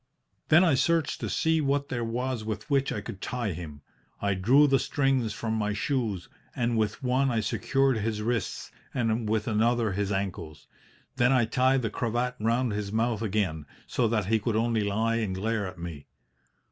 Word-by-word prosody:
"Then 165 Hz, +4 st, +6 dB
I 165 Hz, -5 st, +4 dB
searched 165 Hz, +4 st, +1 dB
to -, -, -3 dB
see 160 Hz, 0 st, +2 dB
what 140 Hz, 0 st, 0 dB
there 120 Hz, -2 st, -2 dB
was 120 Hz, +1 st, -2 dB
with 110 Hz, +2 st, -5 dB
which 135 Hz, -1 st, +2 dB
I 105 Hz, -, -3 dB
could 100 Hz, -, -8 dB
tie 120 Hz, -4 st, -2 dB
him. 75 Hz, -4 st, -8 dB, 0.4 s
I 100 Hz, 0 st, +1 dB
drew 120 Hz, +11 st, +5 dB
the 135 Hz, -2 st, +3 dB
strings 135 Hz, -5 st, +1 dB
from 110 Hz, +2 st, -3 dB
my 105 Hz, -1 st, 0 dB
shoes, 110 Hz, -5 st, -2 dB, 0.3 s
and 120 Hz, -1 st, 0 dB
with 110 Hz, +2 st, -1 dB
one 130 Hz, +2 st, +2 dB
I 115 Hz, -3 st, +1 dB
secured 135 Hz, +5 st, +1 dB
his 105 Hz, 0 st, -2 dB
wrists, 115 Hz, -2 st, -2 dB, 0.2 s
and 115 Hz, -3 st, 0 dB
with 110 Hz, -1 st, 0 dB
another 115 Hz, 0 st, +2 dB
his 100 Hz, +1 st, -1 dB
ankles. 95 Hz, -6 st, -4 dB, 0.5 s
Then 120 Hz, +1 st, +4 dB
I 130 Hz, -3 st, +4 dB
tied 130 Hz, +3 st, +2 dB
the 110 Hz, -, -1 dB
cravat 120 Hz, +2 st, -1 dB
round 115 Hz, +2 st, +1 dB
his 105 Hz, -1 st, -3 dB
mouth 115 Hz, 0 st, 0 dB
again, 95 Hz, -9 st, -1 dB, 0.2 s
so 120 Hz, -, +1 dB
that 110 Hz, -3 st, 0 dB
he 110 Hz, +3 st, +2 dB
could 110 Hz, +1 st, -1 dB
only 115 Hz, 0 st, +1 dB
lie 110 Hz, +3 st, 0 dB
and 105 Hz, -5 st, -1 dB
glare 105 Hz, +1 st, -1 dB
at 95 Hz, 0 st, -9 dB
me. 85 Hz, -4 st, -7 dB
115 Hz, 185 wpm, -28 LUFS, 105-125 Hz, 0.5 s, Then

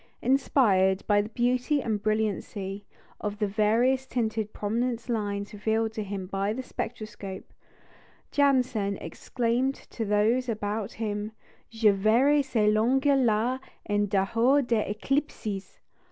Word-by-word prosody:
Inspired 205 Hz, -8 st, +3 dB
by 205 Hz, -1 st, +4 dB
the 210 Hz, -, -6 dB
beauty 250 Hz, +5 st, +1 dB
and 220 Hz, -5 st, -2 dB
brilliancy 205 Hz, -2 st, -2 dB, 0.3 s
of 210 Hz, 0 st, -4 dB
the 210 Hz, -, 0 dB
variously 230 Hz, +6 st, +1 dB
tinted 220 Hz, -3 st, -1 dB
prominence 235 Hz, +3 st, -2 dB
lines 205 Hz, -3 st, -2 dB
revealed 220 Hz, +1 st, 0 dB
to 220 Hz, -, -3 dB
him 195 Hz, -1 st, -5 dB
by 195 Hz, +2 st, -1 dB
the 260 Hz, +3 st, -5 dB
spectroscope, 215 Hz, -6 st, -7 dB, 0.8 s
Janssen 255 Hz, -8 st, +2 dB
exclaimed 245 Hz, +9 st, -1 dB
to 230 Hz, -, -7 dB
those 220 Hz, +5 st, +2 dB
about 210 Hz, -1 st, -3 dB
him, 210 Hz, -1 st, -3 dB, 0.4 s
"Je 225 Hz, -2 st, +3 dB
verrai 235 Hz, +9 st, +4 dB
ces 220 Hz, -5 st, +2 dB
lignes 235 Hz, +5 st, +3 dB, 0.2 s
là 235 Hz, +3 st, +1 dB, 0.3 s
en 205 Hz, 0 st, +1 dB
dehors 230 Hz, +8 st, +2 dB
des 230 Hz, -3 st, +1 dB
éclipses!" 215 Hz, -5 st, -3 dB
220 Hz, 125 wpm, -27 LUFS, 205-245 Hz, 0.8 s, by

